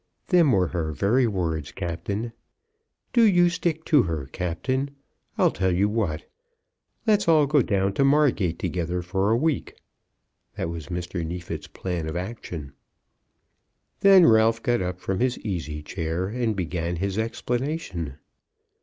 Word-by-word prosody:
Them 170 -6 +5
were 95 -6 +2
her 80 -3 -2
very 115 - +2
words, 85 -7 -2
Captain. 100 +6 -4 0.8
Do 240 - +5
you 175 -5 +5
stick 160 -2 -2
to 150 -4 +5
her, 80 - -3
Captain. 95 +12 -2 0.5
I'll - - +4
tell 95 0 0
you 95 +3 +2
what. 105 -8 -2 0.8
Let's 210 -4 +3
all 155 -3 +5
go 145 0 +3
down 100 -4 0
to 140 - +2
Margate 135 - +3
together 90 +1 -2
for 95 +3 0
a 115 - +3
week." 155 +2 -1 0.8
That - - -3
was 85 -2 -6
Mr. 85 0 -4
Neefit's 85 +2 -5
plan 85 -4 -4
of 80 - -5
action. 90 -7 -6 1.3
Then 195 -3 +7
Ralph 110 -1 +4
got 120 -4 +1
up 90 0 -3
from 95 +1 -2
his 125 0 +1
easy 80 -7 -4
chair 80 +2 -3
and 115 -1 -1
began 85 -2 -2
his 100 +4 -2
explanation. 115 - -3
95 Hz, 145 wpm, -25 LUFS, 85-130 Hz, 1.3 s, Then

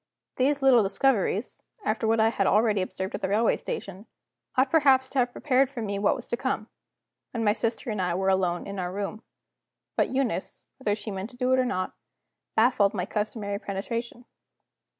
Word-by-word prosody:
These 275 +2 +2
little 255 -3 +7
discoveries 205 +1 +1 0.2
(after 220 +1 0
what 225 0 +3
I 220 0 +5
had 200 -4 0
already 210 -1 +3
observed 190 +1 -4
at - - -4
the - - -1
railway 220 +3 +3
station) 195 +2 -6 0.5
ought 260 +1 +3
perhaps 270 -5 +4
to 270 - 0
have 245 -1 +2
prepared 265 0 +2
me 205 -3 -2
for - - -4
what 205 - +3
was 245 - -8
to - - 0
come, 255 -4 -2 0.6
when 230 -2 -3
my 210 -1 +4
sister 230 +2 -2
and 210 -3 -2
I 180 -1 0
were 190 +1 +1
alone 185 -2 +1
in 200 -1 -5
our 180 -1 -2
room. 205 +3 -4 0.7
But - - +2
Eunice, 260 -7 -2
whether 205 -6 0
she 210 0 -6
meant 195 +2 -5
to 245 - -16
do 255 0 +2
it 260 - +4
or 255 - +3
not, 185 -7 -2 0.6
baffled 220 -3 +3
my 180 - -1
customary 210 -1 -3
penetration. 230 +5 -4
220 Hz, 190 wpm, -27 LUFS, 200-250 Hz, 0.7 s, little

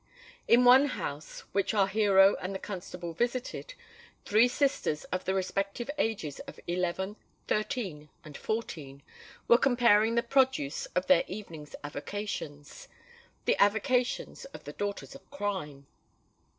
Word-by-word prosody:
In 245 +2 +6
one 260 +3 +8
house 145 - -5
which 200 +2 0
our 200 -2 +5
hero 195 -1 +5
and 190 +2 -5
the - - 0
constable 180 -3 -7
visited, 245 - -3 0.5
three 215 +4 +5
sisters 255 - 0
of 185 - -2
the 190 - 0
respective 195 +6 -2
ages 195 - -1
of - - -10
eleven, 180 +3 -2 0.3
thirteen, 205 - -2 0.2
and 150 -2 -10
fourteen, 145 -12 -5 0.4
were 235 - +6
comparing 235 -4 +4
the 235 - +2
produce 260 - +1
of 180 - +1
their 185 -2 +5
evening's 170 -7 -8
avocations,—the 175 - -6
avocations 245 - +1
of - - -11
the - - -8
daughters 205 +4 -4
of 275 - -15
crime! 185 - -4
200 Hz, 125 wpm, -30 LUFS, 175-240 Hz, 0.5 s, one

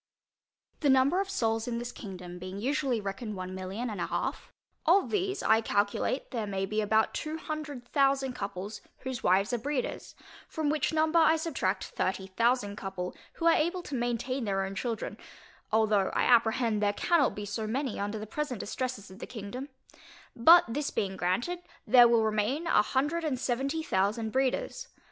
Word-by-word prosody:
The 290 - +2
number 265 +8 +4
of 395 - -4
souls 225 - 0
in 235 -1 -2
this 240 +1 -4
kingdom 180 -5 -8
being 185 +2 -6
usually 265 0 0
reckoned 210 +2 -5
one 185 0 -5
million 190 +6 -4
and 210 -6 -4
a - - -1
half, - - -3 0.4
of 370 +4 +4
these 390 -1 -1
I 220 +1 +4
calculate 205 +5 0
there 225 -4 -2
may 195 -1 -1
be 215 +2 -1
about 220 +1 +2
two 310 +1 -3
hundred 300 -6 -6
thousand 270 -2 +2
couple, 200 -2 -5 0.3
whose 260 -2 -4
wives 195 +5 +2
are 240 - +1
breeders; 275 +1 -3 0.3
from 310 -3 -1
which 305 - 0
number 315 +1 +3
I 320 0 +5
subtract 275 - -1
thirty 190 +1 -2
thousand 220 +1 +1
couple, 190 -3 -5 0.2
who 335 - -4
are 335 - +7
able 345 +3 0
to 295 - -8
maintain 245 +1 -1
their 195 -2 0
own 190 - -5
children, 225 +3 -4 0.5
(although 215 -3 +3
I - - +2
apprehend 230 -2 +3
there 205 -1 +2
cannot 310 +4 +2
be 205 - -5
so 210 +2 -3
many 255 +1 -2
under 205 +2 -2
the 215 - -5
present 250 +1 -3
distresses 250 -3 -4
of 190 - -12
the - - -7
kingdom) 245 +4 -7 0.7
but 325 +9 +8
this 280 +5 -2
being 190 -2 -2
granted, 190 - -1 0.3
there 245 -2 +8
will 235 -1 +4
remain 220 +9 0
a 270 - +4
hundred 295 +9 0
and 295 -5 0
seventy 270 +6 -1
thousand 215 +1 0
breeders. 375 - -1
235 Hz, 180 wpm, -29 LUFS, 205-280 Hz, 0.7 s, but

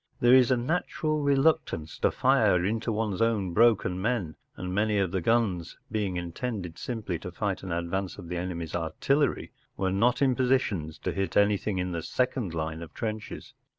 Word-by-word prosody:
There 120 +1 +5
is 130 -1 +6
a 130 - +3
natural 155 +2 -1
reluctance 140 - +1
to - - +3
fire 90 0 +3
into 115 +3 -1
one’s 105 -3 -1
own 105 -6 +1
broken 105 -4 +3
men, 100 -8 -1 0.2
and 90 0 -4
many 105 +1 +1
of 95 -3 +1
the 95 -1 -1
guns, 95 -5 0
being 100 -4 -1
intended 90 0 -4
simply 105 -8 -4
to 90 - -7
fight 100 +1 -2
an 95 - -6
advance 85 +3 -2
of 85 - -9
the 90 +1 -3
enemy’s 85 -3 -4
artillery, 130 - 0 0.3
were 95 -1 0
not 115 +6 +2
in 135 -2 +3
positions 120 - 0
to - - -3
hit 95 0 -2
anything 100 -1 +2
in 90 0 -1
the 85 -1 -3
second 120 - -1
line 80 0 -3
of 80 -2 -10
trenches. 110 -1 -5
100 Hz, 180 wpm, -28 LUFS, 90-120 Hz, 0.3 s, is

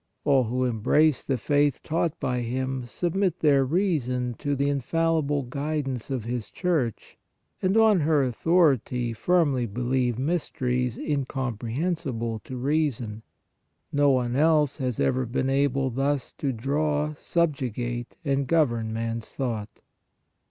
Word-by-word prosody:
All 135 -3 +4
who 125 +3 0
embrace 125 +5 +2
the 135 - -1
faith 145 +2 +1
taught 165 0 -1
by 125 -1 -1
Him, 130 +2 -2
submit 180 +6 0
their 140 -3 +4
reason 130 -7 0
to 145 0 -1
the 140 +1 0
infallible 145 +1 0
guidance 140 -1 -3
of 130 -4 -2
His 115 -2 -4
Church 155 - -2 0.4
and, 190 +3 +2
on 220 -4 +5
her 150 -2 +3
au 130 - 0
thority, 125 -6 +2
firmly 140 -3 +2
believe 120 +2 0
mysteries 125 -5 -1
incomprehensible 130 - -2
to 130 - -6
reason. 125 -6 -1 0.7
No 145 0 +4
one 125 -2 +1
else 150 -1 +3
has 125 -4 -2
ever 130 -1 +1
been 130 +3 -1
able 135 -1 +1
thus 135 +2 -1
to 140 - -2
draw, 145 +5 -1
subjugate 125 -7 -2
and 140 -1 0
govern 120 -9 +1
man 115 +1 -2
s 115 - -11
thought. 115 -6 -4
135 Hz, 130 wpm, -26 LUFS, 120-150 Hz, 0.7 s, on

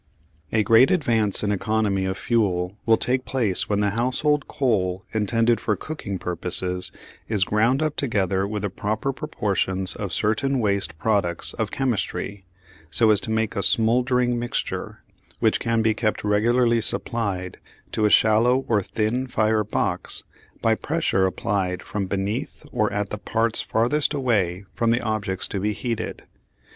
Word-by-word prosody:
A 110 -1 +2
great 115 +5 +6
advance 115 - +1
in 105 - +1
economy 105 -1 0
of 95 0 -2
fuel 95 -6 0
will 110 0 +5
take 130 +1 0
place 115 -10 +1
when 105 -1 +1
the 100 -1 +1
household 130 +6 0
coal 95 -8 0
intended 115 +2 +2
for 105 - 0
cooking 100 - -5
purposes 90 +1 0 0.4
is 105 -4 +2
ground 115 +8 +2
up 155 -1 -1
together 100 -6 0
with 105 -1 -4
the 100 - -2
proper 110 +8 -2
proportions 95 -10 0
of 100 -4 -4
certain 125 +8 +1
waste 100 -6 0
products 95 -3 +1
of - - -2
chemistry, 105 -6 -2 0.5
so 110 +8 +4
as 105 -1 +3
to - - -3
make 110 0 0
a 100 - 0
"smouldering 120 +4 +2
mixture" 120 0 -4 0.4
which - - +2
can 115 -1 0
be 110 0 +3
kept 110 0 -1
regularly 115 +3 +2
supplied 100 -4 0 0.3
to 110 - +1
a - - +4
shallow 115 +5 +4
or 105 -3 +2
thin 110 +6 -1
fire 110 -2 +1
box - - -2 0.4
by 115 - +4
pressure 130 -8 0
applied 95 -1 -2
from 100 -2 -3
beneath 100 +10 -3
or 105 - 0
at 100 0 -2
the 105 - -4
parts 115 +1 0
farthest 140 +7 0
away 100 -9 0
from 115 -1 0
the 120 +2 +2
objects 105 -4 -2
to 100 - -3
be 105 +2 0
heated. 115 0 -4
110 Hz, 155 wpm, -23 LUFS, 100-120 Hz, 0.5 s, great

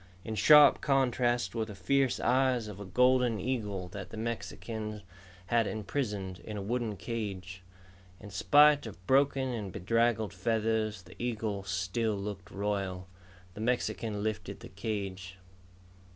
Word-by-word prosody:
In 110 - -4
sharp 145 +7 +7
contrast 125 -3 +1
were 115 -1 -1
the 105 -2 -9
fierce 135 +8 +1
eyes 130 -3 +2
of 105 -2 -8
a 100 - -7
golden 125 +1 +3
eagle 105 -6 -2
that 95 0 -7
the 110 - -9
Mexican 110 -2 -5 0.4
had 115 +2 +2
imprisoned 105 -4 -3
in 105 +5 -7
a - - -3
wooden 115 -1 -2
cage. 95 -5 -5 0.6
In 105 -1 -11
spite 145 +7 +5
of 95 -3 -11
broken 135 +1 +3
and 105 -6 -4
bedraggled 110 +2 +1
feathers, 110 -3 0
the 90 +1 -15
eagle 110 -4 -2
still 95 +4 -1
looked 100 0 -6
royal. 100 -3 -3 0.5
The 105 - -8
Mexican 110 -3 -1
lifted 100 -2 -4
the - - -10
cage. 95 -3 -5
110 Hz, 135 wpm, -31 LUFS, 100-120 Hz, 0.6 s, sharp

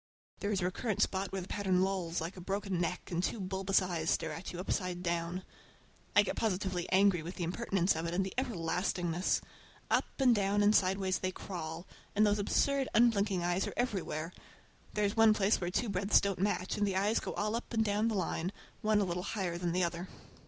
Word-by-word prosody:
There 205 - -2
is 200 -2 0
a - - 0
recurrent 200 +3 -2
spot 190 0 -1
where 195 0 -3
the - - -10
pattern 190 -3 +1
lolls 185 -3 -1
like 165 +3 -4
a 185 - -9
broken 195 -1 -2
neck 180 +2 -3
and 175 0 0
two 225 - -1
bulbous 190 0 +1
eyes 170 -3 -2
stare 160 - 0
at 165 +5 -6
you 175 - -7
upside 180 -1 -2
down. 170 +1 -2 0.7
I 205 - +7
get - - -3
positively 185 -4 -1
angry 190 -2 +4
with 170 +4 -7
the 175 - -3
impertinence 185 0 +1
of 160 +1 -2
it 170 - -3
and 190 +1 +1
the 190 - -5
everlastingness. 180 -6 0 0.5
Up - - +3
and 260 -3 +5
down 205 -1 +2
and 210 +1 +5
sideways 190 0 +2
they 185 - -1
crawl, 170 -2 -6 0.3
and 210 +1 +5
those 205 0 +2
absurd, 275 +6 +1
unblinking 205 -6 +3
eyes 175 +2 +1
are - - -6
everywhere. 180 -8 -2 0.6
There 210 0 +2
is 200 - -1
one 225 -1 +6
place 205 0 +2
where 175 - -1
two 230 +6 0
breadths 200 0 +3
didn't 195 -2 -2
match, 195 -1 0
and 205 -1 +2
the 195 - -1
eyes 205 +4 +2
go - - -5
all 210 +2 0
up 235 - -5
and 225 -2 +1
down 210 +2 +1
the 225 - 0
line, 180 -1 -1 0.3
one 215 -1 +3
a - - +2
little 175 0 -2
higher 185 -3 -3
than 175 -1 -1
the 180 +1 +1
other. 170 +1 -2
190 Hz, 215 wpm, -32 LUFS, 175-205 Hz, 0.7 s, I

